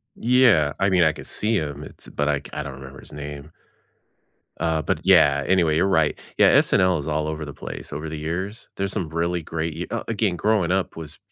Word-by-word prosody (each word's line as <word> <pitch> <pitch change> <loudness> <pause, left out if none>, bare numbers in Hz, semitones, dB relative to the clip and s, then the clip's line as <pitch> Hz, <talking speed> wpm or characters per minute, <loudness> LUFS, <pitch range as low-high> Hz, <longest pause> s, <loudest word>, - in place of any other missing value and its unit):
Yeah. 115 - +4
I 95 - +3
mean, 90 -2 +4
I 80 -1 +3
could - - -10
see 110 +2 0
him, 75 -5 -3
it's - - -13
but 75 - -2
I 75 -1 +1
c - - -19
I 75 - -3
don't 70 -1 -7
remember 65 0 -11
his - - -11
name 75 +1 -8 1.1
uh, 80 -1 0
but, - - -1
yeah, 70 0 +5
anyway, 85 -4 +3
you're 90 +5 +3
right. 80 -5 +2 0.2
Yeah, - - +6
SNL 90 -3 +3
is 75 - -6
all 75 0 -1
over 80 0 -4
the 75 - -8
place, - - -6
over 75 +2 -5
the 80 - -5
years. 90 +8 -4
There's 100 -1 -1
some 90 -7 -2
really 85 +2 -1
great 80 0 -4
y 90 - -3
oh, - - -5
again, 105 -5 0
growing 100 -1 +1
up 95 0 -1
was 80 -1 -6
80 Hz, 225 wpm, -23 LUFS, 75-95 Hz, 1.1 s, Yeah